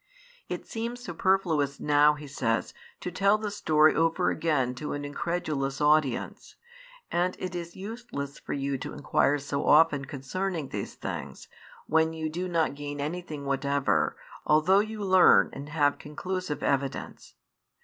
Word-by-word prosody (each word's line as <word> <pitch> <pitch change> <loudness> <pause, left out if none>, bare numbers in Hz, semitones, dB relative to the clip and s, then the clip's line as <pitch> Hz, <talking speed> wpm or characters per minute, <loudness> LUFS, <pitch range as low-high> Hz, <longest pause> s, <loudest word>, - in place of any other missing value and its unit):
It - - -4
seems 235 +2 -4
superfluous 175 - 0
now, 150 0 +4
he 150 0 -9
says, 125 -5 -1 0.3
to 180 - -4
tell 200 +4 +3
the 215 -1 -4
story 155 -6 +4
over 165 0 +2
again 145 -6 0
to 150 +4 -5
an 145 0 -4
incredulous 145 -3 -2
audience, 150 -4 +1 0.6
and 180 +1 +1
it 185 -1 -4
is 170 -1 -6
useless 200 - -6
for - - -5
you 140 -1 -2
to - - -6
inquire 145 +1 +2
so 140 0 -3
often 150 -2 +5
concerning 155 +3 -4
these - - -5
things, - - -6 0.4
when 160 +1 +2
you 160 -1 -3
do 180 +3 -3
not 165 -4 +1
gain 145 0 -6
anything 155 -1 -4
whatever, 140 - +1 0.3
although 155 +6 +4
you 215 0 -3
learn 185 -1 +6
and 140 +2 -8
have 145 -2 +1
conclusive 180 +1 -4
evidence. 135 -1 -2
155 Hz, 145 wpm, -28 LUFS, 140-180 Hz, 0.6 s, learn